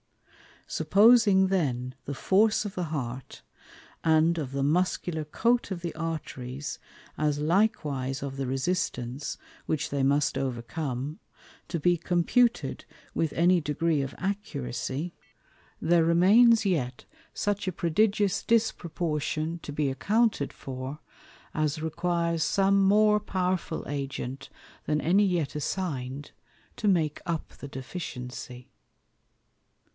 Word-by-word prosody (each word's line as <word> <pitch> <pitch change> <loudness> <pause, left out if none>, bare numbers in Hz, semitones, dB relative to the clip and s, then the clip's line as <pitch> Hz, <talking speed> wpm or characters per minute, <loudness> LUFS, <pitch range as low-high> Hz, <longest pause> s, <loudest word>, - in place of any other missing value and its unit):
Supposing 200 +3 +5
then 130 -9 -1
the 140 - -4
force 210 +9 +3
of 200 - -4
the 180 - -1
Heart, 135 -5 -5 0.6
and 160 +1 +4
of 140 -5 -3
the 140 0 0
Muscular 160 0 0
Coat 235 +10 +1
of 185 -3 -4
the 170 -2 -4
Arteries, 145 -4 -5 0.4
as 150 -1 +1
likewise 150 - 0
of 135 -1 -5
the 135 -1 -2
resistance, 135 -2 -2 0.3
which 150 -1 -1
they 140 -1 -1
must 140 +1 +2
overcome, 130 +2 -3 0.5
to 170 -1 -2
be 175 +3 +3
computed 180 +9 +1 0.3
with 160 -2 0
any 175 +2 +4
degree 155 0 0
of 135 -1 -5
accuracy, 150 - -3 0.7
there 165 0 +4
remains 215 +7 +6
yet 130 -10 -1 0.3
such 205 -1 -1
a - - +1
prodigious 200 +4 +1
disproportion 170 -7 -1
to 145 - -8
be 145 -1 0
accounted 210 - +1
for, 130 +2 -6 0.5
as 155 0 -1
requires 170 0 0
some 195 +1 +3
more 210 +2 +5
powerful 185 -4 -2
Agent, 135 -1 -4 0.4
than 150 0 0
any 190 +8 +4
yet 175 -6 0
assign'd, 145 -4 -3 0.5
to 215 - -1
make 160 -6 +2
up 165 -2 -2
the 140 - -8
deficiency. 125 -2 -7
160 Hz, 115 wpm, -28 LUFS, 140-185 Hz, 0.7 s, remains